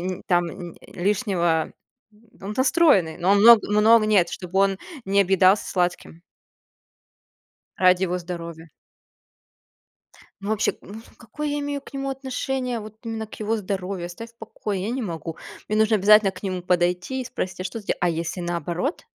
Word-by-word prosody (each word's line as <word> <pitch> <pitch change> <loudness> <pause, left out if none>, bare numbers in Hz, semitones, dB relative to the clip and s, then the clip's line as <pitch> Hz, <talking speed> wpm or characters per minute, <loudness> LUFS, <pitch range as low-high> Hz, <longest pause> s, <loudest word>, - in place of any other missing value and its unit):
нь 185 0 -4
там 175 -1 +2 0.3
нь - - -20
лишнего 180 -4 0 0.7
он-то 215 +7 -1
стройный, 240 - +3
но 180 +3 +1
он 200 - +5
много 225 -2 +7
много 215 +1 +5
нет, 200 -5 +3
чтобы 185 +1 -4
он 195 -1 +2 0.3
не 200 +1 +2
объедался 190 +1 +4
сладким. 175 -2 -2 1.5
Ради 185 0 +4
его 180 0 -2
здоровья. 170 -2 -8 1.7
Ну, 200 - -4
вообще, 220 -1 +1
ну 210 +3 -10 0.2
какое 300 +7 -6
я 290 0 -2
имею 285 0 -3
к - - -16
нему 275 0 -4
отношение, 260 -2 -3
вот 215 0 -9
именно 225 -1 -5
к - - -12
его 220 +2 0
здоровью? 190 -3 -4
Оставь 230 +7 -9
в 230 - -34
покое! 210 -3 -5
Я 220 - -2
не 255 0 -3
могу. 165 -4 -5 0.3
Мне 215 - 0
нужно 220 0 +3
обязательно 210 0 +5
к 185 - -13
нему 185 -2 -3
подойти 180 +7 0
и - - -9
спросить:"А 185 -6 -5
что 220 +4 -5
ты 205 - -19
делал?" - - 0
А 175 - +2
если 165 +2 -3
наоборот 175 - -3
195 Hz, 165 wpm, -23 LUFS, 180-225 Hz, 1.7 s, много